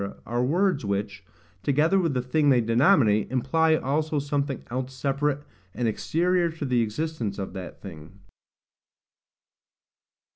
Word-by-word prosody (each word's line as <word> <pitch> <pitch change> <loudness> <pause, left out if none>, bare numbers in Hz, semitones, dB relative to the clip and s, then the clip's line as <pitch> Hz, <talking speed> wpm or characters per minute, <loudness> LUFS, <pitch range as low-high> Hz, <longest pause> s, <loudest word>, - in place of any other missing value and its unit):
are 120 +1 -1
words 175 +2 +1
which, 100 0 -3 0.4
together 150 - +2
with 165 -7 0
the 125 - 0
thing 145 +3 +2
they 130 -3 +5
denominate, 115 - +3
imply 160 +6 +2
also 155 +2 -1
something 140 -1 -2
else 130 +1 -4
separate 140 +2 -1 0.3
and 120 - 0
exterior 175 - +1
to 160 -2 -6
the 125 -3 +2
existence 115 -1 -3
of 95 -2 -5
that 95 -2 -8
thing. 80 -4 -10
135 Hz, 125 wpm, -25 LUFS, 115-155 Hz, 0.4 s, they